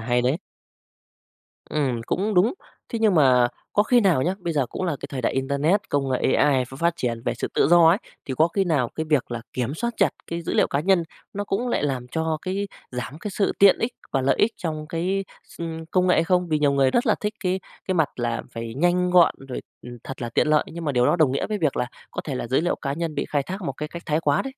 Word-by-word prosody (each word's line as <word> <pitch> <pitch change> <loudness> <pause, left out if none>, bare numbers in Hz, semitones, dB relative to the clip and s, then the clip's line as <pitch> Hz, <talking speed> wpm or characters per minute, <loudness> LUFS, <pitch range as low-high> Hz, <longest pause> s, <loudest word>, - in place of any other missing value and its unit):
hay 120 +2 +1
đấy. 130 +7 +1 1.3
Ừm, 135 -6 0
cũng 205 +2 0
đúng. 185 +6 +4 0.4
Thế 230 - -3
nhưng 215 -4 +3
mà 125 -5 +5 0.2
có 205 - +4
khi 245 +3 +4
nào 185 - +3
nhá, 180 +5 0
bây 175 -3 -3
giờ 140 -4 +1
cũng 185 - -4
là 165 -5 -1
cái - - -5
thời 135 -2 -3
đại - - +1
internet, 140 +9 +1
công 140 -1 0
nghệ 130 +1 +1
AI 135 -3 +3
ph 130 +2 -12
phát 170 0 +2
triển 115 -2 -2
về - - 0
sự - - -3
tự - - +3
do 170 -1 +7
ấy, 180 +5 +4 0.3
thì 130 - -4
có 160 +2 +5
khi 195 +3 0
nào 145 -9 +1
cái 160 0 -3
việc 140 -5 +2
là 120 -1 -3
kiểm 130 +3 -2
soát 235 +6 -2
chặt - - +4 0.2
cái 170 0 -4
dữ - - -3
liệu - - +4
cá 140 - -1
nhân 185 0 +3 0.3
nó 205 +1 -3
cũng 230 +6 -1
lại 235 - 0
làm 130 -4 -2
cho 160 +2 -1
cái 195 +2 -2 0.2
giảm 125 +4 -5
cái 210 - -5
sự 200 +1 0
tiện 200 -1 +6
ích 235 +2 -1 0.2
và 135 - +2
lợi 135 +1 +2
ích 225 +2 +3
trong 155 -3 -4
cái 185 +4 -1 0.2
s - - -16
ưm, 165 -1 -5
công 185 +2 +1
nghệ 180 - +4
hay 165 - +3
không? 180 0 +1
Vì 155 - +1
nhiều 145 -1 +3
người 135 -1 +3
rất 240 +2 +1
là 215 - +4
thích 210 +1 -2
cái 185 0 0 0.3
cái 185 - +1
mặt 160 -4 +2
là 120 -1 -2
phải 115 0 -6
nhanh 175 +4 +2
gọn 180 -2 +6
rồi, 125 - -4 0.2
ừm, 120 0 -9
thật 135 -1 -7
là 120 - -2
tiện 115 - +1
lợi 150 -1 +3
nhưng 165 0 -7
mà 145 - 0
điều 125 -1 +3
đó 175 - +3
đồng 150 -5 +3
nghĩa 140 - -1
với 210 -1 -2
việc 155 -7 0
là 125 - 0 0.2
có - - -4
thể 140 - -3
là 120 - -3
giới 130 +5 +2
liệu 175 - 0
cá 140 - -3
nhân 165 +1 -3
bị - - -1
khai 145 -2 +1
thác 190 +7 -6
một 140 - -2
cái 150 +3 -5
cách 170 +1 -8
thái 155 0 +1
quá 145 -2 +2
đấy. 270 - -5
160 Hz, 275 wpm, -24 LUFS, 135-180 Hz, 1.3 s, do